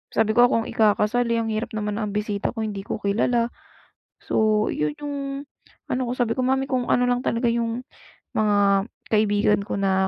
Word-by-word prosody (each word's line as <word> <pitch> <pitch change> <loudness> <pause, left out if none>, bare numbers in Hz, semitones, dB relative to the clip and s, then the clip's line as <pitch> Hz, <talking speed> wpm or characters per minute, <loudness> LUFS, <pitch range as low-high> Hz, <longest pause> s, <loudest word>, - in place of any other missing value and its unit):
sabi 220 -1 +3
ko, 240 +2 +6
"Ako - - -1
ang - - -8
ikakasal, 220 +2 +2
eh. 235 - +1
Ang 225 - -2
hirap 215 +1 -3
naman 210 0 -2
na 210 - -1
ang 205 - -6
bisita 210 +2 -2
ko 225 - -2
hindi 210 -2 -3
ko - - -2
kilala." 230 +4 +1 0.7
So 215 -1 +2
'yon 150 0 -1
yung 290 -1 -3 0.8
ano 255 - 0
ko. - - -1
Sabi 235 -2 +1
ko, - - +1
"Mommy 265 +1 +1
kung 255 -3 -1
ano 245 - +3
lang 245 0 +1
talaga 235 0 0
yung 235 +2 -2 0.5
mga 205 -2 +3 0.3
kaibigan 210 -1 +3
ko, - - -3
na 190 -1 +2
220 Hz, 195 wpm, -24 LUFS, 205-240 Hz, 0.8 s, ko